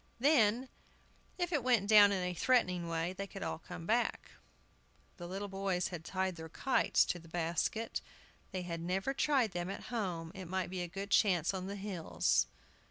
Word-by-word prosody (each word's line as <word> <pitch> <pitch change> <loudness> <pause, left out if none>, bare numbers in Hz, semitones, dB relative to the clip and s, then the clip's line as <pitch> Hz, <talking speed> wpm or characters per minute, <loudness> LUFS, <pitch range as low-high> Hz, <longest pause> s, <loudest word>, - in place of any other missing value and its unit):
Then, 250 -3 +4 0.7
if 350 -1 -1
it 295 -5 +1
went 240 -6 +3
down 205 -1 +8
in 190 -2 0
a 180 0 -1
threatening 180 -5 +2
way, 165 +2 -1
they 200 +1 -5
could 195 - -7
all - - -3
come 175 0 -9
back. 235 +5 0 0.9
The 175 - -7
little 195 +3 -4
boys 195 -2 -1
had 175 -3 -6
tied 185 0 -2
their 160 0 -8
kites 260 +10 +2
to 175 - -2
the 165 - -15
basket. 170 +7 -1 0.5
They 185 -1 -3
had 170 -1 -4
never 190 +9 -1
tried 265 -6 +2
them 175 0 -3
at 195 - -7
home; 175 -7 -2
it 190 -1 -7
might 185 0 -2
be 185 -1 -3
a 175 - -3
good 195 +3 -6
chance 180 -5 +3
on 185 -1 -4
the 200 - -4
hills. 195 -4 0
190 Hz, 185 wpm, -34 LUFS, 175-210 Hz, 0.9 s, down